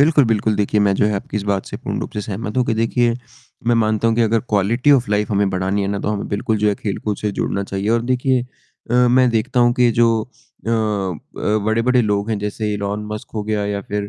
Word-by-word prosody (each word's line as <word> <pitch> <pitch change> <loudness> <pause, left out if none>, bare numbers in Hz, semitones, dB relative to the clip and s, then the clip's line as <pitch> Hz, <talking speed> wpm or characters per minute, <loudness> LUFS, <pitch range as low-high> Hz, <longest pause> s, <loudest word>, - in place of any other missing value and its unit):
बिल्कुल, 150 -1 +5
बिल्कुल 110 -1 +1
देखिए 105 +1 +1
मैं 100 -1 +3
जो - - +2
है 105 - 0
आपकी 100 +1 -4
इस 105 - -1
बात 100 -2 -1
से - - -6
पूर्ण - - -4
रूप - - -5
से 105 - -2
सहमत 105 +2 -5
हूँ 125 - +3
कि 115 - +1
देखिए, 115 +1 +1 0.5
मैं 120 - +4
मानता 110 0 +2
हूँ 115 - +2
कि 120 - +3
अगर 115 0 +2
क्वालिटी 110 +7 +2
ऑफ़ 125 -5 +2
लाइफ 105 0 0
हमें 100 -1 +2
बढ़ानी 95 +2 -1
है 100 - -1
ना 100 0 -1
तो - - -2
हमें 105 -1 -2
बिल्कुल 110 +2 -1
जो 105 0 +2
है 105 - +1
खेलकूद 105 +1 -3
से 105 - -2
जुड़ना 100 - -2
चाहिए 100 +1 -3
और 115 0 +2
देखिए 130 0 +1 0.5
अ, - - +1
मैं 125 +1 +4
देखता 115 +2 0
हूँ 120 0 +4
कि 120 -1 +5
जो 120 - +6 0.2
अ 115 -1 -14
अ, 105 -2 -1
बड़े-बड़े 115 +3 +2
लोग 105 0 0
हैं, 110 - 0
जैसे 105 +1 -3
इलोन 100 +1 -3
मस्क 105 - -7
हो 105 - -2
गया 105 -1 -1
या 100 0 -2
फिर 105 0 -4
105 Hz, 245 wpm, -19 LUFS, 100-115 Hz, 0.5 s, जो